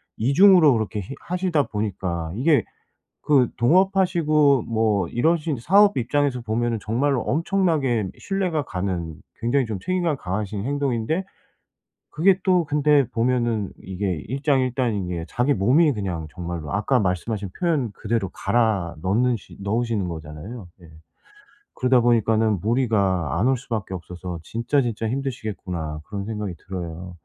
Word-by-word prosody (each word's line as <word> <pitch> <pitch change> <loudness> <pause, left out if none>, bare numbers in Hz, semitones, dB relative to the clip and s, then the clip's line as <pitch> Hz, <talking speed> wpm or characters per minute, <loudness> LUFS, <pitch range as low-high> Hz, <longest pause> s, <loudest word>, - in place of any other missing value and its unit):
2 130 +5 0
중으로 180 -7 +7
그렇게 110 -1 -2
히 115 +9 -8
하시다 180 -4 0
보니까 95 -6 -3
이게 145 +5 +3 0.6
그 135 -5 +4
동업하시고 155 -2 +3
뭐 110 -5 +1
이러신 155 - 0
사업 200 - +4
입장에서 130 0 0
보면은 115 +1 -1
정말로 125 +6 0
엄청나게 150 - +1
신뢰가 185 -5 -1
가는 90 -6 -3 0.3
굉장히 125 +3 +1
좀 110 -4 -4
책임감이 175 - -1
강하신 100 +2 -3
행동인데 140 +3 -1 0.9
그게 185 +4 +3
또 180 -3 +3
근데 145 -2 +3
보면은 120 -3 0
이게 95 -3 -3
일장일단인 130 - 0
게 85 -2 -4
자기 125 - +1
몸이 140 - +4
그냥 90 -7 -4
정말로 85 -4 -6
아까 105 +6 +1
말씀하신 100 +1 -2
표현 155 - 0
그대로 110 -3 -2
갈아 110 -8 0
넣는 115 +7 +2
시 110 - -12
넣으시는 110 -1 -1
거잖아요. 80 +7 -8
예. 90 - -17 0.9
그러다 125 0 +3
보니까는 110 -2 +2
무리가 100 - +1
안 110 - +2
올 135 - +3
수밖에 115 -6 -5
없어서 90 -1 -7
'진짜, 115 - 0
진짜 115 -3 -2
힘드시겠구나.' 105 - -4
그런 100 -2 -4
생각이 105 -4 -4
들어요. 90 -1 -6
115 Hz, 325 characters per minute, -23 LUFS, 95-140 Hz, 0.9 s, 중으로